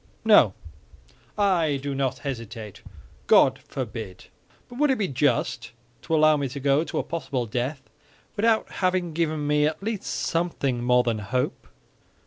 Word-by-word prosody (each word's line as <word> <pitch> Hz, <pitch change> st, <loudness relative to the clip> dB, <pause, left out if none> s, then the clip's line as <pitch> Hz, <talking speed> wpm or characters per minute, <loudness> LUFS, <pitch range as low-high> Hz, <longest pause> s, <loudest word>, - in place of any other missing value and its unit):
"No, 165 Hz, -, +6 dB, 0.8 s
I 175 Hz, -8 st, +2 dB
do 140 Hz, +1 st, -4 dB
not 135 Hz, -1 st, -1 dB
hesitate; 115 Hz, -6 st, -6 dB, 0.5 s
God -, -, +5 dB
forbid! 95 Hz, -5 st, -7 dB, 0.4 s
But 245 Hz, -, -11 dB
would 295 Hz, 0 st, +3 dB
it 265 Hz, -, +2 dB
be 200 Hz, -, 0 dB
just 130 Hz, -4 st, 0 dB, 0.3 s
to 165 Hz, -, -1 dB
allow 155 Hz, -1 st, +5 dB
me 140 Hz, -1 st, -1 dB
to 140 Hz, +3 st, -6 dB
go 140 Hz, +2 st, +2 dB
to -, -, -5 dB
a -, -, 0 dB
possible 140 Hz, -7 st, -3 dB
death 125 Hz, +5 st, -3 dB, 0.5 s
without 220 Hz, +1 st, +2 dB
having 185 Hz, -3 st, 0 dB
given 155 Hz, -2 st, -1 dB
me 150 Hz, 0 st, +3 dB
at 155 Hz, +5 st, -4 dB
least 215 Hz, -2 st, -3 dB
something 155 Hz, -7 st, -1 dB
more 125 Hz, 0 st, +4 dB
than 115 Hz, -3 st, -1 dB
hope?" 125 Hz, +5 st, -3 dB
145 Hz, 150 wpm, -25 LUFS, 125-170 Hz, 0.8 s, No